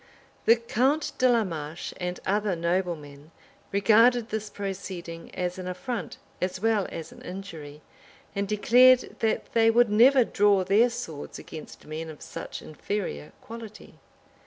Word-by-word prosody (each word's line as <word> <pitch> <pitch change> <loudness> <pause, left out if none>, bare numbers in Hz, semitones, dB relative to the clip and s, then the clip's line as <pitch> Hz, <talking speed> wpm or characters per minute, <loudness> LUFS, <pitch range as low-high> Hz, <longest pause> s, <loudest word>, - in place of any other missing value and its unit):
The 230 - +7
count 265 +6 0
de 255 -1 +5
la 235 -2 +4
Marche 160 -3 -5
and 180 0 -4
other 205 -1 +1
noblemen 165 -4 -3 0.4
regarded 225 +4 +4
this 215 -1 -3
proceeding 185 -4 -6
as 180 +1 -3
an 185 - -5
affront, 225 +6 -4 0.2
as 185 0 -2
well 220 -2 +1
as 165 - -7
an - - -14
injury; 165 -6 -8 0.5
and 200 0 -1
declared, 245 +5 +5
that 225 -1 -1
they 225 -1 +5
would 235 -1 +4
never 250 +5 +6
draw 205 -3 +3
their 205 +6 +4
swords 230 -12 -7
against 155 - -10
men 160 +1 -6
of 155 - -10
such - - -7
inferior 150 - -4
quality. 225 -2 -11
200 Hz, 140 wpm, -27 LUFS, 170-230 Hz, 0.5 s, The